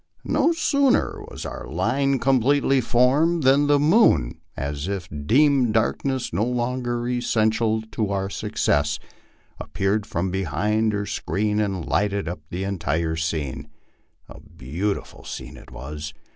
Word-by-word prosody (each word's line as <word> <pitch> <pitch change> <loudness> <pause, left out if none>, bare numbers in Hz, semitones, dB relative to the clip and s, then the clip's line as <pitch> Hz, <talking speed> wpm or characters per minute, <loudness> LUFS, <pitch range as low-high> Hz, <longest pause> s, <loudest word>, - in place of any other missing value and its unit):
No 335 - +2
sooner 280 -5 +2
was - - -8
our - - -6
line 140 0 +1
oompletely 135 +1 +3
formed 140 +8 +2
than 140 +2 +4
the 145 0 +5
moon, 145 - +3 0.2
as 70 +4 -3
if 100 -3 -3 0.2
deeming 135 -2 +4
darkness 125 +3 0
no 100 +6 +1
longer 120 0 -1
essential 110 -2 +1
to 110 -3 -1
our 95 -1 -1
success, 75 -6 0 0.6
appeared 100 +2 -1
from 90 +2 -2
behind 95 +5 0
her 100 0 -1
screen 105 +1 -1
and 95 -5 -1
lighted 100 -3 0
up 85 -1 -4
the 90 +2 -4
entire 85 -4 -1
scene. 80 -4 -3 0.6
And - - -12
a - - -17
beautiful 90 +11 -4
scene - - -7
it - - -14
was. 75 +4 -7
105 Hz, 135 wpm, -23 LUFS, 90-130 Hz, 0.6 s, the